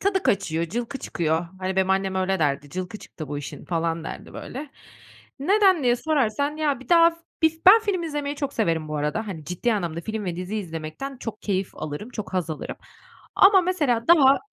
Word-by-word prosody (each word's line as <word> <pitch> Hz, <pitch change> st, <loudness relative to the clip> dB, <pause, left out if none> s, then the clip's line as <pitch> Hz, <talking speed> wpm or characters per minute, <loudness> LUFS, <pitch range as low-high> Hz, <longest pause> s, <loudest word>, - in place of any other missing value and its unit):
tadı 390 Hz, -1 st, +1 dB
kaçıyor, 170 Hz, -4 st, +1 dB
cılkı 240 Hz, -, -4 dB
çıkıyor. 165 Hz, 0 st, -1 dB
Hani, 190 Hz, 0 st, -3 dB
benim 190 Hz, 0 st, +2 dB
annem 190 Hz, 0 st, +1 dB
öyle 190 Hz, 0 st, 0 dB
derdi, 145 Hz, -2 st, 0 dB
"Cılkı 185 Hz, +3 st, -5 dB
çıktı 155 Hz, -4 st, -9 dB
bu 145 Hz, -1 st, -3 dB
işin," 145 Hz, -, -8 dB
falan 165 Hz, -1 st, -1 dB
derdi, -, -, -8 dB
böyle. 280 Hz, +3 st, -7 dB, 0.7 s
Neden 380 Hz, +2 st, +4 dB
diye 245 Hz, -1 st, +3 dB
sorarsan, 285 Hz, 0 st, 0 dB
ya, 290 Hz, -4 st, 0 dB
bir -, -, -14 dB
daha 335 Hz, -1 st, +7 dB
f 330 Hz, -, -15 dB, 0.3 s
bi 320 Hz, -1 st, +5 dB
ben 435 Hz, +4 st, +10 dB
film 400 Hz, -5 st, -1 dB
izlemeyi 295 Hz, -3 st, -3 dB
çok 280 Hz, -1 st, -3 dB
severim 165 Hz, -8 st, 0 dB
bu 155 Hz, -, -3 dB
arada, 150 Hz, +10 st, -1 dB
hani, 160 Hz, -6 st, -6 dB
ciddi 180 Hz, +9 st, -1 dB
anlamda 170 Hz, -4 st, -2 dB
film 215 Hz, +2 st, -4 dB
ve 175 Hz, -2 st, -3 dB
dizi 185 Hz, +4 st, -4 dB
izlemekten 165 Hz, -, -5 dB
çok 225 Hz, -3 st, -7 dB
keyif 195 Hz, -2 st, -1 dB
alırım, 155 Hz, +11 st, -6 dB
çok 215 Hz, -5 st, -6 dB
haz 180 Hz, -3 st, -1 dB
alırım 155 Hz, -, -5 dB, 0.6 s
ama 385 Hz, -1 st, +7 dB
mesela 300 Hz, -10 st, 0 dB
daha 280 Hz, -5 st, +7 dB
215 Hz, 195 wpm, -24 LUFS, -, 0.7 s, ben